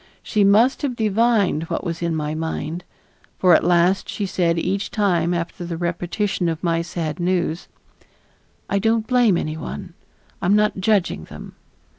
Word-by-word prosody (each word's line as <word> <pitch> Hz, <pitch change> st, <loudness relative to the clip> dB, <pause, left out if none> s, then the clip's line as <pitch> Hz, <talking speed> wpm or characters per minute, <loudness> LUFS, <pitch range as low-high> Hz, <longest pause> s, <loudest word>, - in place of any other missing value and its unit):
She 210 Hz, -, +1 dB
must 215 Hz, +6 st, +4 dB
have 275 Hz, -4 st, -2 dB
divined 215 Hz, -6 st, +2 dB
what -, -, -3 dB
was 170 Hz, -2 st, -4 dB
in 170 Hz, -1 st, -1 dB
my 150 Hz, -1 st, -2 dB
mind, 160 Hz, +1 st, -4 dB, 0.5 s
for 180 Hz, -2 st, +5 dB
at -, -, +5 dB
last 175 Hz, +2 st, +2 dB
she 205 Hz, -, -3 dB
said 170 Hz, -3 st, 0 dB
each 190 Hz, +4 st, -1 dB
time 175 Hz, -5 st, +1 dB
after 175 Hz, +1 st, -3 dB
the 170 Hz, -1 st, -4 dB
repetition 175 Hz, +2 st, -1 dB
of 165 Hz, +2 st, -4 dB
my 165 Hz, -1 st, +1 dB
sad 170 Hz, -2 st, -4 dB
news: 175 Hz, -1 st, -1 dB, 1.0 s
"I 200 Hz, -, 0 dB
don't 225 Hz, +1 st, +1 dB
blame 240 Hz, -6 st, +3 dB
any 155 Hz, -1 st, -3 dB
one, 70 Hz, -, -7 dB, 0.5 s
I -, -, -1 dB
am 200 Hz, -, +4 dB
not 210 Hz, -2 st, +2 dB
judging 190 Hz, -, +1 dB
them." -, -, -11 dB
175 Hz, 165 wpm, -21 LUFS, 165-205 Hz, 1.0 s, for